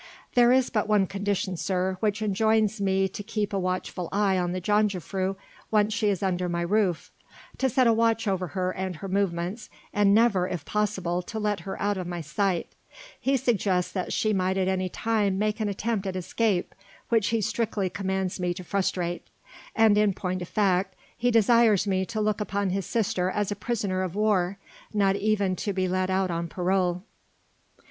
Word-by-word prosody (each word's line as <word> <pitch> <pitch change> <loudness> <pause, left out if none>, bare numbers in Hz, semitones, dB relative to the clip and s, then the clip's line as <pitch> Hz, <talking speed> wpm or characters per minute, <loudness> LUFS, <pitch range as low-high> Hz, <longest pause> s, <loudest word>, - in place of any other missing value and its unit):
"There 240 0 +5
is 255 0 +3
but 210 -2 0
one 210 -2 +3
condition, 195 -1 -2
sir, 185 +1 -1
which 210 +1 0
enjoins 215 +1 +2
me 190 0 +2
to 195 - -7
keep 210 0 -3
a 195 - +1
watchful 185 -1 -3
eye 200 -1 +2
on 175 -1 0
the 185 - -2
jongejuffrouw 195 -1 0 0.3
once 210 0 +2
she 220 -1 0
is 200 -1 -1
under 180 -2 0
my 170 0 -1
roof: 190 -2 0 0.5
to 265 - +2
set 255 +1 +3
a 230 - +5
watch 225 0 +1
over 185 -2 0
her 185 0 0
and 185 -1 -4
her 195 - -7
movements, 190 +2 -2 0.2
and 205 -1 +4
never, 210 -6 +3
if 175 -5 -5
possible, 190 -4 -1
to 220 +5 -7
let 210 -1 0
her 195 - -6
out 205 0 0
of 180 -2 -4
my 175 -1 -4
sight; 170 +3 -1 0.5
he 270 +1 +2
suggests 200 -8 +1
that 185 -2 -3
she 215 -1 +1
might 190 0 0
at 190 -1 +1
any 185 -1 0
time 210 -2 0
make 215 +2 0
an 215 -1 0
attempt 205 0 -2
at 190 - -3
escape, 185 +1 0 0.4
which 225 -4 +3
he 230 - +1
strictly 215 -2 -1
commands 190 -1 -2
me 175 -1 -1
to 185 - -7
frustrate, 180 -2 -2 0.5
and 220 -2 +5
in 205 -3 +2
point 185 -1 -3
of 175 - -5
fact 190 -2 +1 0.2
he 245 +1 +1
desires 230 -2 +4
me 190 -2 0
to 225 -1 -3
look 215 0 0
upon 200 -2 -1
his 195 -1 -2
sister 195 -4 0
as 205 +1 -1
a - - -1
prisoner 205 -4 -2
of 185 -1 -3
war 200 -3 +1 0.4
not 195 -2 +3
even 200 -2 +1
to 205 +3 -2
be 185 -1 0
let 185 +1 0
out 190 -1 +1
on 170 0 -2
parole." 180 0 0
195 Hz, 190 wpm, -26 LUFS, 185-215 Hz, 0.5 s, There